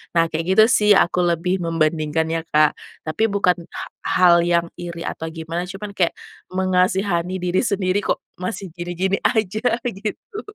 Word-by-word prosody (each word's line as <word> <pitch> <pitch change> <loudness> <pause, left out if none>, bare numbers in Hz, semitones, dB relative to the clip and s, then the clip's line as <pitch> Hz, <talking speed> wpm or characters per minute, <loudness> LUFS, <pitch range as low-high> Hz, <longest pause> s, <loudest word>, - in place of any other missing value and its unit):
Nah 165 0 +4
kayak 165 +1 -2
gitu 215 - +8
sih 210 -4 +4
aku 180 -2 +3
lebih 175 +2 0
membandingkan 160 -1 0
ya, 165 0 -1
Kak. 155 -1 +3 0.3
Tapi 155 +8 +1
bukan 190 -3 +2
ha - - -6 0.2
hal 175 -2 +4
yang 170 -1 +2
iri 170 -1 -6
atau 160 - -5
gimana, 165 +2 -4
cuman 200 +2 -7
kayak 175 -3 +2 0.4
mengasihani 185 -1 +1
diri 180 +1 +1
sendiri, 200 -2 0
“Kok - - 0 0.2
masih 190 +1 -4
gini-gini 175 +2 -1
aja,” 215 -2 +1 0.3
gitu. 220 - -5
180 Hz, 155 wpm, -21 LUFS, 165-195 Hz, 0.4 s, gitu